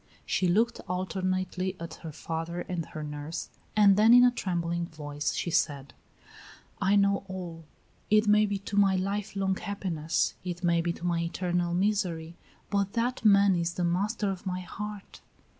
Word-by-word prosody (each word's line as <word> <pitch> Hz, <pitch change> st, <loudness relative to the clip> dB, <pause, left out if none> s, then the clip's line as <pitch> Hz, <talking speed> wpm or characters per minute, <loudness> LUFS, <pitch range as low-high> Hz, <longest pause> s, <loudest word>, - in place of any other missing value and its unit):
She 185 Hz, -, +1 dB
looked 225 Hz, +7 st, +2 dB
alternately 185 Hz, 0 st, -2 dB
at 170 Hz, 0 st, -6 dB
her 160 Hz, -, -6 dB
father 165 Hz, +3 st, -4 dB
and 175 Hz, -3 st, -4 dB
at -, -, -18 dB
her 155 Hz, -, -5 dB
nurse, 150 Hz, +2 st, -5 dB, 0.3 s
and 205 Hz, -2 st, +6 dB
then 220 Hz, +3 st, +7 dB
in 245 Hz, -, +8 dB
a 250 Hz, -, +6 dB
trembling 170 Hz, -5 st, -2 dB
voice 145 Hz, -2 st, -4 dB
she 170 Hz, -, -2 dB
said: 140 Hz, -4 st, 0 dB, 0.9 s
"I 200 Hz, +1 st, +3 dB
know 200 Hz, -1 st, +3 dB
all. 175 Hz, -4 st, -7 dB, 0.4 s
It 215 Hz, 0 st, +4 dB
may 210 Hz, 0 st, +5 dB
be 200 Hz, 0 st, -1 dB
to 200 Hz, +1 st, -6 dB
my 195 Hz, -1 st, +5 dB
life 200 Hz, +2 st, -2 dB
long 190 Hz, -1 st, +1 dB
happiness; 180 Hz, -6 st, -1 dB
it 180 Hz, 0 st, -5 dB
may 170 Hz, -1 st, +3 dB
be 170 Hz, 0 st, 0 dB
to 170 Hz, -, -7 dB
my 170 Hz, -1 st, +1 dB
eternal 175 Hz, 0 st, -1 dB
misery; 180 Hz, -4 st, 0 dB, 0.4 s
but 200 Hz, -1 st, 0 dB
that 245 Hz, +2 st, -1 dB
man 200 Hz, -2 st, +6 dB
is 170 Hz, -1 st, -1 dB
the 180 Hz, -, -1 dB
master 200 Hz, +4 st, 0 dB
of 190 Hz, 0 st, -7 dB
my 185 Hz, 0 st, -2 dB
heart." 205 Hz, +3 st, -8 dB
185 Hz, 175 wpm, -28 LUFS, 170-200 Hz, 0.9 s, in